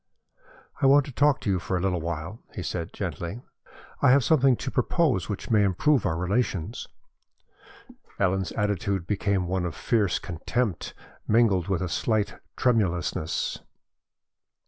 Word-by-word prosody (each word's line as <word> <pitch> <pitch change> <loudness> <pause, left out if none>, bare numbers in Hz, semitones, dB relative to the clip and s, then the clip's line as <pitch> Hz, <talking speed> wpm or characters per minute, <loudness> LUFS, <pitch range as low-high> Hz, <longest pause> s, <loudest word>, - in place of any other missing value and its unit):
"I 135 - +5
want 140 0 +6
to - - -8
talk 145 +2 +2
to - - -2
you 95 - +1
for 95 - -2
a - - -1
little 90 -2 0
while," 85 +5 -5 0.2
he - - -4
said, - - -4
gently. 100 +9 -5 0.6
"I - - +5
have 135 +1 +5
something 135 -4 +4
to 130 - -5
propose 125 - +1
which 105 +3 -5
may 105 -2 +5
improve 110 +8 +2
our 80 - -1
relations." 100 +2 -1 1.3
Ellen's 95 -2 +1
attitude 100 -3 -1
became 100 -1 0
one 90 +1 -1
of 85 -5 -3
fierce 105 - +1
contempt 100 +3 -3 0.3
mingled 105 -6 +3
with 95 -2 0
a - - -1
slight 110 +4 -1 0.2
tremulousness. 90 -9 0
100 Hz, 145 wpm, -26 LUFS, 90-120 Hz, 1.3 s, want